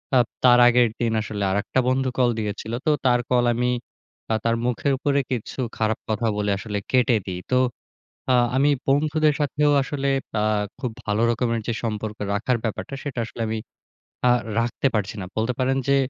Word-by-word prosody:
আ - - +7 0.3
তার 125 -1 +7
আগের 120 0 +5
দিন 115 -1 +1
আসলে 105 -2 -4
আরেকটা 100 +6 0
বন্ধু 130 0 +1
কল 125 -2 +4
দিয়েছিলো। 110 +2 -3
তো - - +3 0.2
তার 125 -1 +4
কল 125 -1 +4
আমি 125 +1 0 0.6
তা - - 0
তার 115 0 +3
মুখের 125 +3 0
উপরে 140 +1 +1
কিছু 125 +1 -4 0.2
খারাপ 110 0 0
কথা 110 +2 0
বলে 105 0 0
আসলে 105 0 -4
কেটে 125 -2 +4
দেই। 90 -2 -4
তো - - +4 0.8
আ - - +4 0.2
আমি 140 +2 +4 0.2
বন্ধুদের 150 +2 +3
সাথেও 150 +1 +2
আসলে 140 0 -2 0.3
আ - - +1 0.3
খুব 125 -4 -3
ভালো 105 +2 +1
রকমের 115 -1 0
যে 115 - 0
সম্পর্ক 110 -1 -3 0.2
রাখার 120 +4 +1
ব্যাপারটা 115 +4 -3
সেটা 135 -4 -4
আসলে 115 - -10
আমি 110 0 -2 0.7
আ - - +6 0.3
রাখতে 120 +3 0
পারছি 105 -2 -1
না। - - -4
বলতে 110 +3 +1
পারেন 135 +1 +1
যে 140 - +5
120 Hz, 180 wpm, -23 LUFS, 110-130 Hz, 0.8 s, আ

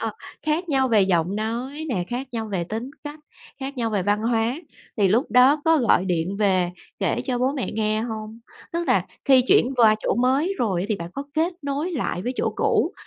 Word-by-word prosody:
Ờ, - - -1 0.4
khác 330 +4 0
nhau 265 -3 +2
về 220 -3 +4
giọng 185 0 +1
nói 245 +8 -3
nè, 185 -8 -1
khác 250 +3 -3
nhau 225 -2 -3
về 175 -3 -1
tính 225 +7 -5
cách, 295 +1 -7 0.4
khác 270 +1 -5
nhau 230 -2 -1
về 205 -4 0
văn 205 +2 +1
hóa. 230 0 +1 0.4
Thì 200 -3 +3
lúc 230 +8 +1
đó 255 +4 +6
có 325 -1 +4
gọi 230 -7 +3
điện 180 +1 -1
về 185 -4 +2 0.3
kể - - 0
cho 250 -3 -1
bố 260 +2 +1
mẹ 270 -4 -3
nghe 215 0 0
hông? 220 -1 -6 0.3
Tức 340 0 -1
là - - +2 0.2
khi 265 -3 +6
chuyển 260 +2 +4
qua 225 -3 +6
chỗ - - 0
mới 270 +10 +1
rồi 190 -6 0
thì 215 - 0
bạn 170 -1 -7
có 275 - -3
kết 330 +3 +1
nối 285 +5 -2
lại 235 - -2
với 245 +4 -2
chỗ - - 0
cũ - - +1
235 Hz, 215 wpm, -23 LUFS, 210-270 Hz, 0.4 s, đó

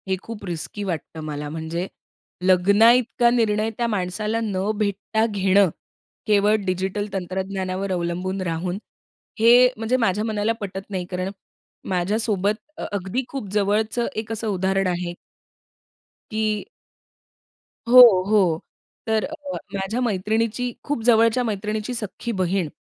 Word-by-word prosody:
हे 190 - +1
खूप 225 -2 -8
रिस्की 175 +4 -4
वाटतं 165 -3 -5
मला, 150 -1 -5
म्हणजे 165 +3 -4 0.6
लग्नाइतका 225 +7 +4
निर्णय 220 -2 +1
त्या 235 - 0
माणसाला 210 +2 -1
न 200 -1 -1
भेटता 210 +1 0
घेणं, 200 -2 +3 0.6
केवळ 210 0 +4
डिजिटल 190 +2 -1
तंत्रज्ञानावर 190 +1 -3
अवलंबून 180 +2 -2
राहून, 175 +1 -2 0.6
हे 240 +3 +7
म्हणजे 225 +3 0
माझ्या 210 -4 +1
मनाला 215 0 0
पटत 195 0 -6
नाही, 185 -3 -3
कारण 185 +1 -2 0.6
माझ्यासोबत 200 +2 +1 0.2
अ - - -5
अगदी 200 +6 -2
खूप 265 -8 -5
जवळचं 210 +3 +1
एक 220 +1 -4
असं 225 0 -2
उदाहरण 190 -1 +1
आहे. 175 -1 -2 1.2
की 215 -1 -1 1.2
हो 250 +1 +10 0.3
हो. 185 -7 +3 0.5
तर 220 -1 +1
अ 305 - -8 0.2
अ - - -3 0.2
माझ्या 200 +5 -2
मैत्रिणीची 225 +3 0
खूप 290 -5 -2
जवळच्या 230 +1 +4
मैत्रिणीची 215 +1 -3
सख्खी 230 0 -4
बहीण. 185 -3 0
205 Hz, 125 wpm, -23 LUFS, 185-220 Hz, 1.2 s, हो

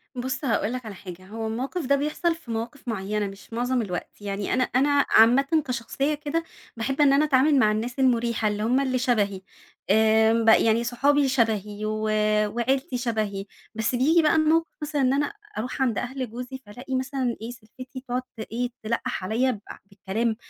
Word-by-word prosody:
بُص 260 +3 -3
هاقول 225 -1 0
لَك 250 -2 -5
على 205 -3 -7
حاجة، 180 0 -10
هو 220 +1 -5
الموقف 260 +8 -3
ده 280 +2 +3
بيحصل 305 +4 0
في 285 -8 -10
مواقف 235 +4 -5
معيّنة 210 -1 -2
مش 195 +3 -12
مُعظم 245 +1 0
الوقت. 185 0 -6
يعني 200 0 -3
أنا 255 0 +3
أنا 280 +3 +2
عامةً 275 +7 +5
كشخصية 255 +4 -1
كده 300 +3 -2 0.3
باحب 270 +5 -1
إن 275 -1 +6
أنا 295 +2 +4
أتعامل 285 +1 +4
مع 215 -3 +4
الناس 235 +5 -3
المريحة 235 -4 +2
اللي 210 0 -1
هُم 250 +4 +2
اللي 260 -2 0
شبهي، 205 -6 0 0.5
آآ، 220 +1 +4
ب 230 -1 +1
يعني 225 +1 +5
صحابي 280 +4 +2
شبهي 215 -4 0
و 215 0 -2 0.5
وعيلتي 255 +5 -1
شبهي. 215 -5 -2 0.3
بس 225 +3 0
بييجي 315 +7 +4
بقى 305 0 +3
الموقف 320 +1 +3
مثلًا 295 -1 -1
إن 260 +1 +3
أنا 290 +7 0 0.2
أرُوح 250 +4 -4
عند 240 -5 +1
أهل 255 -1 -3
جوزي 250 +3 -7
فالاقي 250 +6 -6
مثلًا 260 -2 -1
إيه 230 +2 -5
سِلفتي 255 +3 -11
تقعد 250 +1 -1
ت 250 - -23
إيه 245 +1 -1
تلقّح 220 -4 -2
عليّا 240 +6 +1
ب 210 - -6 0.3
بالكلام 210 +3 -2
245 Hz, 180 wpm, -25 LUFS, 220-270 Hz, 0.5 s, إن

